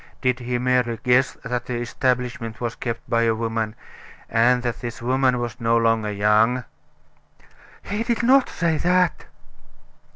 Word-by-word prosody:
Did 125 Hz, -1 st, 0 dB
he 125 Hz, 0 st, -2 dB
merely 125 Hz, -2 st, +1 dB
guess 125 Hz, +2 st, +3 dB
that 125 Hz, 0 st, -3 dB
the 125 Hz, -, -3 dB
establishment 120 Hz, -1 st, -2 dB
was 120 Hz, -2 st, -3 dB
kept 115 Hz, -2 st, -5 dB
by 115 Hz, 0 st, +1 dB
a 115 Hz, -1 st, +2 dB
woman; 115 Hz, -1 st, -2 dB, 0.6 s
and 120 Hz, +2 st, +3 dB
that 120 Hz, -2 st, -3 dB
this 120 Hz, -1 st, -6 dB
woman 130 Hz, +1 st, +1 dB
was 120 Hz, -1 st, -4 dB
no 115 Hz, 0 st, +3 dB
longer 115 Hz, -2 st, +1 dB
young?" 105 Hz, +5 st, +2 dB, 1.2 s
"He 205 Hz, +2 st, -3 dB
did 235 Hz, +1 st, -1 dB
not 265 Hz, +2 st, +4 dB
say 165 Hz, -2 st, 0 dB
that." 180 Hz, 0 st, +1 dB
120 Hz, 150 wpm, -22 LUFS, 115-130 Hz, 1.2 s, not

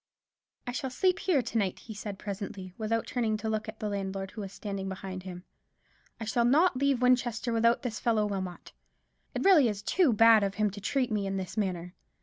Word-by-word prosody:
"I 245 Hz, -, -3 dB
shall 260 Hz, +2 st, -3 dB
sleep 365 Hz, +9 st, +1 dB
here 305 Hz, -9 st, +2 dB
to 230 Hz, 0 st, -3 dB
night," 195 Hz, -3 st, -1 dB
he 225 Hz, -, -10 dB
said 205 Hz, -1 st, -6 dB
presently, 195 Hz, -2 st, -6 dB
without 225 Hz, +1 st, -1 dB
turning 225 Hz, -3 st, 0 dB
to 215 Hz, +1 st, -5 dB
look 215 Hz, 0 st, -2 dB
at 220 Hz, -, -9 dB
the 215 Hz, -, -2 dB
landlord, 195 Hz, -1 st, -3 dB
who 215 Hz, -, -7 dB
was 195 Hz, -2 st, -6 dB
standing 195 Hz, -2 st, -5 dB
behind 190 Hz, 0 st, -6 dB
him. 180 Hz, -1 st, -8 dB, 0.8 s
"I 225 Hz, -, -4 dB
shall 235 Hz, +2 st, +1 dB
not 295 Hz, +7 st, +4 dB
leave 270 Hz, -1 st, +1 dB
Winchester 245 Hz, -1 st, +2 dB
without 230 Hz, +1 st, +3 dB
this 225 Hz, -4 st, -3 dB
fellow 220 Hz, -3 st, +2 dB
Wilmot. 190 Hz, -3 st, -5 dB, 0.6 s
It -, -, -1 dB
is -, -, -3 dB
really 310 Hz, -, +6 dB
too 265 Hz, -, +2 dB
bad 225 Hz, -1 st, +6 dB
of 200 Hz, 0 st, -1 dB
him 210 Hz, -1 st, +1 dB
to 200 Hz, +1 st, -9 dB
treat 255 Hz, +3 st, 0 dB
me 205 Hz, -2 st, 0 dB
in 195 Hz, 0 st, -2 dB
this 190 Hz, +1 st, -5 dB
manner. 180 Hz, -4 st, -2 dB
215 Hz, 210 wpm, -29 LUFS, 195-240 Hz, 0.8 s, really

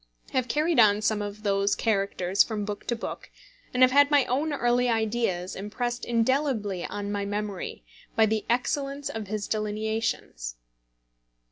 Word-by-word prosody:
I -, -, 0 dB
have 255 Hz, -1 st, +1 dB
carried 305 Hz, +3 st, +2 dB
on 210 Hz, -1 st, +5 dB
some 210 Hz, -1 st, +1 dB
of 205 Hz, +1 st, -6 dB
those 200 Hz, 0 st, +2 dB
characters 195 Hz, -3 st, +1 dB
from 215 Hz, -3 st, -3 dB
book 205 Hz, 0 st, -6 dB
to 240 Hz, -, +1 dB
book, 225 Hz, -, -6 dB, 0.4 s
and 250 Hz, 0 st, +4 dB
have 255 Hz, -, +6 dB
had 285 Hz, +1 st, +6 dB
my 290 Hz, -3 st, +4 dB
own 285 Hz, +5 st, 0 dB
early 245 Hz, -2 st, +2 dB
ideas 220 Hz, -5 st, 0 dB
impressed 240 Hz, +5 st, -3 dB
indelibly 230 Hz, -5 st, 0 dB
on 205 Hz, 0 st, -4 dB
my 205 Hz, -1 st, -1 dB
memory 205 Hz, -1 st, -4 dB, 0.3 s
by 220 Hz, -, +5 dB
the 220 Hz, 0 st, 0 dB
excellence 275 Hz, +3 st, -1 dB
of 220 Hz, -2 st, -5 dB
his 210 Hz, 0 st, -3 dB
delineations. 215 Hz, -, -2 dB
220 Hz, 155 wpm, -27 LUFS, 205-245 Hz, 0.4 s, have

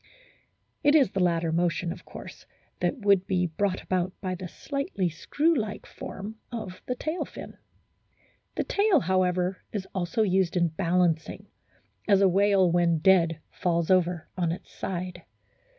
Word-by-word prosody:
It 290 Hz, +1 st, +5 dB
is 270 Hz, -10 st, +5 dB
the 195 Hz, -, -2 dB
latter 170 Hz, -2 st, +2 dB
motion, 170 Hz, +1 st, 0 dB
of -, -, -9 dB
course, -, -, -11 dB, 0.3 s
that -, -, 0 dB
would 195 Hz, -2 st, +4 dB
be 180 Hz, -2 st, +1 dB
brought 185 Hz, +3 st, -1 dB
about 185 Hz, 0 st, -1 dB
by 185 Hz, -2 st, -3 dB
the 180 Hz, 0 st, -6 dB
slightly 275 Hz, -, -2 dB
screw 295 Hz, -, +1 dB
like 215 Hz, -5 st, -3 dB
form 210 Hz, +3 st, -8 dB
of 205 Hz, -6 st, -6 dB
the 250 Hz, -, -1 dB
tail 315 Hz, +7 st, -2 dB
fin. -, -, -10 dB, 1.0 s
The -, -, 0 dB
tail, 400 Hz, -7 st, +3 dB
however, 185 Hz, 0 st, +1 dB
is 200 Hz, -3 st, -4 dB
also 190 Hz, +4 st, 0 dB
used 190 Hz, -3 st, +1 dB
in 170 Hz, -1 st, +3 dB
balancing, 170 Hz, -1 st, 0 dB, 0.6 s
as 200 Hz, -3 st, +5 dB
a 195 Hz, -, +5 dB
whale 195 Hz, -1 st, +4 dB
when 170 Hz, -1 st, +3 dB
dead 165 Hz, -2 st, +3 dB
falls 170 Hz, -1 st, 0 dB
over 180 Hz, -2 st, +2 dB
on 175 Hz, -3 st, 0 dB
its 170 Hz, -, -8 dB
side. 180 Hz, -1 st, -4 dB
185 Hz, 150 wpm, -27 LUFS, 175-200 Hz, 1.0 s, It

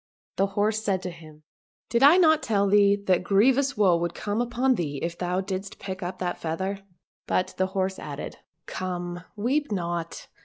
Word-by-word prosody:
And 195 Hz, -, +2 dB
the -, -, -15 dB
horse 210 Hz, +2 st, +1 dB
said 190 Hz, -3 st, 0 dB
to 180 Hz, -, -4 dB
him, 155 Hz, -2 st, -14 dB, 0.2 s
" -, -, -71 dB
Did 235 Hz, +1 st, +2 dB
I 290 Hz, +6 st, +8 dB
not 315 Hz, -4 st, +5 dB
tell 200 Hz, -3 st, +1 dB
thee 200 Hz, 0 st, +5 dB
that 185 Hz, -1 st, +2 dB
grievous 255 Hz, +9 st, +3 dB
woe 190 Hz, -4 st, +5 dB
would 170 Hz, 0 st, -3 dB
come 210 Hz, +2 st, -2 dB
upon 245 Hz, +2 st, +1 dB
thee 155 Hz, -, -3 dB
if 170 Hz, 0 st, -2 dB
thou 180 Hz, +1 st, -1 dB
didst 195 Hz, +1 st, -5 dB
pick 190 Hz, 0 st, -6 dB
up 180 Hz, +1 st, -4 dB
that 180 Hz, -1 st, -3 dB
feather 190 Hz, +5 st, -3 dB, 0.2 s
} -, -, -50 dB
" -, -, -
But 185 Hz, -, 0 dB
the 185 Hz, -, +2 dB
horse 190 Hz, 0 st, -1 dB
added, 145 Hz, -1 st, -7 dB, 0.2 s
" -, -, -53 dB
Come! 175 Hz, -1 st, -4 dB
weep 265 Hz, +7 st, 0 dB
not 170 Hz, -3 st, -3 dB
190 Hz, 205 wpm, -26 LUFS, 175-215 Hz, 0.2 s, I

